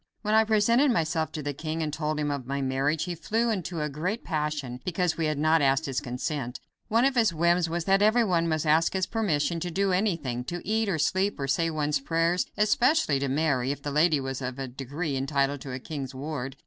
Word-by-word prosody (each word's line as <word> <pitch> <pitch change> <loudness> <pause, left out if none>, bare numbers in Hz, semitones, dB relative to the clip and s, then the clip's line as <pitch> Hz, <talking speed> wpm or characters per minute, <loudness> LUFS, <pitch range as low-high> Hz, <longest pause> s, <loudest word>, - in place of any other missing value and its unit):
When 210 0 0
I 220 0 +5
presented 230 +6 +3
myself 160 -7 0
to 155 - -4
the 145 0 -2
king 160 +3 -3
and 150 -1 -3
told 155 -1 -2
him 145 -1 0
of 140 -3 -4
my 140 +1 -2
marriage, 135 +3 0
he 180 - -3
flew 225 +7 0
into 180 -5 -3
a - - -1
great 175 +10 -3
passion 150 -6 -3
because 180 -1 0
we 160 -1 0
had 155 -1 -1
not 155 +2 +3
asked 135 +2 +2
his 135 0 -2
consent. 125 0 -4 0.3
One 230 +3 +3
of 275 - +3
his 225 -9 +2
whims 170 +1 +2
was 170 0 -2
that 195 +1 +3
everyone 210 -6 +3
must 155 0 0
ask 155 +2 +3
his 190 -1 +1
permission 170 -7 0
to 175 +2 -3
do 195 +3 0
anything; 165 - 0
to 175 +5 -5
eat, 220 0 +1
or 175 - 0
sleep, 190 +6 0
or 135 - -2
say 165 +5 +1
one's 150 -2 0
prayers; 165 +4 0
especially 225 - +3
to 140 - -1
marry, 135 -2 +1
if 140 -1 -6
the 145 - -3
lady 155 +1 +3
was 135 0 -4
of 125 0 -4
a 135 -1 -4
degree 140 +4 -4
entitled 140 +1 0
to 140 - -8
be 125 - -4
a - - -5
king's 135 -2 -6
ward. 135 -1 -5
155 Hz, 230 wpm, -27 LUFS, 140-180 Hz, 0.3 s, I